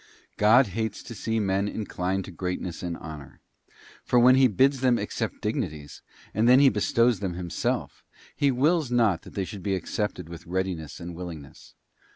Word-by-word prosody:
God 115 +5 +6
hates 110 +2 -3
to 120 - -8
see 115 0 -2
men 100 -1 0
inclined 95 -3 -3
to - - -9
greatness 90 -1 -4
and 85 -2 -4
honour; 75 -4 -10 0.6
for 125 - +1
when 125 +1 +7
He 130 0 +6
bids 135 +5 +2
them 125 -2 +3
accept - - -4
dig - - 0
nities, 75 -2 -5 0.3
and 110 +3 +2
when 125 +2 +7
He 140 -1 +7
bestows 115 +1 +2
them 95 -4 -3
Himself, 85 -2 -3 0.3
He 140 - +2
wills 145 +3 +2
not 115 -8 +2
that - - -14
they 95 - -1
should 100 0 -8
be 95 +1 -1
accepted 95 -1 -3
with 85 0 -10
readiness 90 -3 -3
and 85 0 -7
willingness. 85 -5 -10
100 Hz, 180 wpm, -26 LUFS, 90-120 Hz, 0.6 s, when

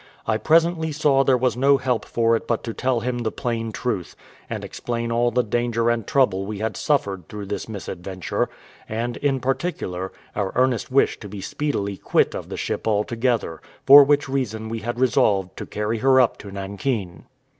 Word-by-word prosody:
I 110 - +1
presently 160 +3 +2
saw 145 -2 +3
there 130 -2 +4
was 125 -2 +1
no 140 +3 +4
help 130 -3 -1
for 115 0 +2
it 115 - -4
but 115 - -1
to 115 - -4
tell 130 -1 0
him 120 +1 -2
the 110 -2 -1
plain 115 -2 -3
truth, 105 -6 -3 0.3
and - - -4
explain 115 -1 -4
all 120 +1 +2
the 125 +1 +1
danger 120 +1 0
and 115 -3 -2
trouble 105 -9 +2
we 105 -1 -4
had 110 +1 -2
suffered 100 - -1
through 105 -1 -6
this 100 +3 -5
misadventure, 95 -3 -4 0.4
and, 115 +2 -3
in 135 -2 0
particular, 125 - -2 0.2
our 100 -2 -2
earnest 125 -2 +1
wish 135 - +3
to 105 - -9
be 105 +1 -7
speedily 100 -3 -2
quit - - +1
of - - -6
the - - -5
ship - - -3
altogether; 110 -3 0 0.2
for 140 +1 +10
which 145 +1 +2
reason 110 -5 -2
we 115 0 -3
had 120 +2 -4
resolved 100 -7 +2
to - - -6
carry 105 +2 -2
her 130 +2 +5
up 125 -3 +3
to 100 - -9
Nankin. 100 -1 -4
115 Hz, 190 wpm, -23 LUFS, 105-130 Hz, 0.4 s, for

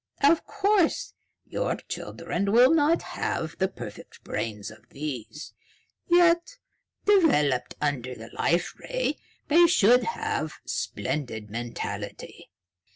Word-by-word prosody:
Of 310 +4 +4
course, 415 +2 +1 0.3
your - - -2
children 200 0 -4
will 245 +6 +6
not 320 +1 +3
have 160 0 -3
the 190 - +3
perfect 190 - -10
brains 105 -3 -4
of 110 +1 -17
these, 145 0 -6 0.5
yet, 345 +6 +4 0.5
developed 285 - +3
under 130 -4 -2
the 115 0 -11
Life 170 +1 0
Ray, - - -2 0.3
they 340 +3 +6
should 245 - +5
have 460 - -2
splendid 110 -8 -3
mentality. 120 +1 -6
200 Hz, 105 wpm, -26 LUFS, -, 0.5 s, will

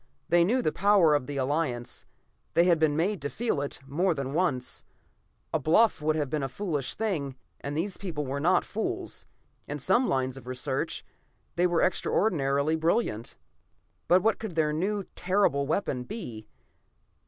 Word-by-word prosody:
They 175 0 +5
knew 245 +8 +2
the 155 - +2
power 195 -4 +4
of 145 -4 +1
the 145 -1 -4
Alliance; 130 -3 -2 0.5
they 170 - +6
had 175 -2 +4
been 155 -2 +2
made 190 +4 0
to 145 - -2
feel 225 -9 -1
it 140 - -4
more 170 +6 +1
than 135 -1 -3
once. 145 -7 0 0.7
A - - +2
bluff 210 +4 +3
would 155 +1 +1
have 150 -2 0
been 150 +2 -2
a 135 - -2
foolish 150 -3 -2
thing, 160 -12 -2 0.2
and 145 +1 -4
these 180 +3 -2
people 160 -7 -4
were 135 +2 -3
not 175 +5 +3
fools. 220 +1 -4 0.4
In - - -3
some 245 +1 +2
lines 130 -1 0
of 125 -2 -12
research 125 0 -2 0.5
they 175 +1 +3
were 175 -2 +2
extraordinarily 155 -6 +1
brilliant. 160 - 0 0.7
But 180 +1 +5
what 220 0 +2
could 220 -7 -6
their 155 -2 +2
new, 200 +6 -1
terrible 180 -7 +2
weapon 145 -6 -1
be? 120 - -7
160 Hz, 165 wpm, -28 LUFS, 140-185 Hz, 0.7 s, they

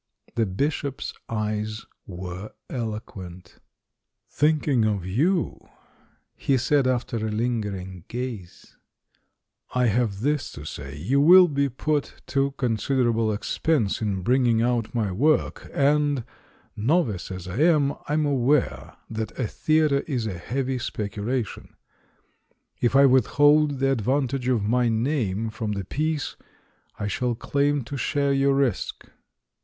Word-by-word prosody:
The 115 -2 +1
Bishop's 140 +7 -2 0.2
eyes 110 0 -2 0.2
were 90 +2 -7 0.2
eloquent. 95 -7 -6 0.7
"Thinking 150 -5 +2
of 105 -4 0
you," 155 - 0 0.7
he 135 - +1
said, 135 +1 +2
after 120 -2 -1
a 110 0 -2
lingering 105 -6 -3
gaze, 120 -7 -7 1.0
"I 125 0 +3
have 110 -3 +1
this 145 +2 0
to 75 - -9
say: 70 -1 -7
you 130 - +1
will 180 +4 +8
be 140 -2 0
put 145 +3 -1 0.2
to 140 0 +2
considerable 115 -1 +1
ex 105 - -4
pense 140 -13 +1
in 100 -4 -1
bringing 120 -1 +3
out 120 -1 0
my 110 -4 0
work, 145 +11 +1
and, 145 -2 +2 0.5
novice 115 - 0
as 95 -1 -7
I 95 +4 -5
am, 150 -2 +4
I'm 150 +1 +1
aware 140 0 +1
that 110 0 -5
a 130 - 0
theatre 155 +3 +2
is 125 -7 -1
a 95 -5 -4
heavy 130 +5 -2
specula 110 +1 -2
tion; 105 - -12 1.0
if 120 +1 +1
I 140 +1 +7
withhold 145 +3 +4
the 135 +1 +2
advantage 130 +1 0
of 120 -5 +2
my 120 +3 +2
name 115 -3 0
from 110 -1 -3
the 100 -2 -4
piece, 155 - -2 0.6
I - - -3
shall 120 +3 -1
claim 140 +3 0
to 140 +5 -6
share 140 0 +1
your 135 0 +3
risk." 135 -8 -1
125 Hz, 130 wpm, -25 LUFS, 105-140 Hz, 1.0 s, will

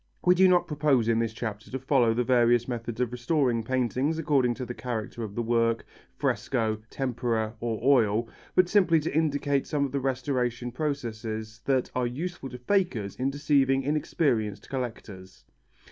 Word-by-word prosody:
We 180 - +7
do 185 +1 +5
not 180 -1 +4
propose 145 -6 +2
in 115 -1 +2
this 115 -1 0
chapter 110 -2 -6
to 130 - -3
follow 130 -4 +2
the 125 - +1
various 120 -1 +3
methods 120 -2 -4
of 125 -2 0
restoring 125 -2 0
paintings 130 +5 0
according 135 -6 +2
to 130 - -5
the 125 - -5
character 120 -2 -5
of 105 -2 -7
the 120 - -1
work, 115 0 +1 0.3
fresco, 110 -4 0
tempera 120 -4 -1
or 115 -2 -2
oil, 115 -4 +3 0.3
but 185 -1 +5
simply 180 -4 +4
to 150 -1 -4
indicate 145 -3 +1
some 145 -2 0
of 135 - -5
the 140 - -1
restoration 125 -2 -1
processes 115 -6 -4
that 130 -2 +1
are 125 -1 0
useful 145 +2 -5
to 125 - -8
fakers 125 - 0
in 130 +2 0
deceiving 140 -1 +2
inexperienced 140 - -1
collectors. 110 -7 -6
125 Hz, 165 wpm, -27 LUFS, 115-140 Hz, 0.3 s, We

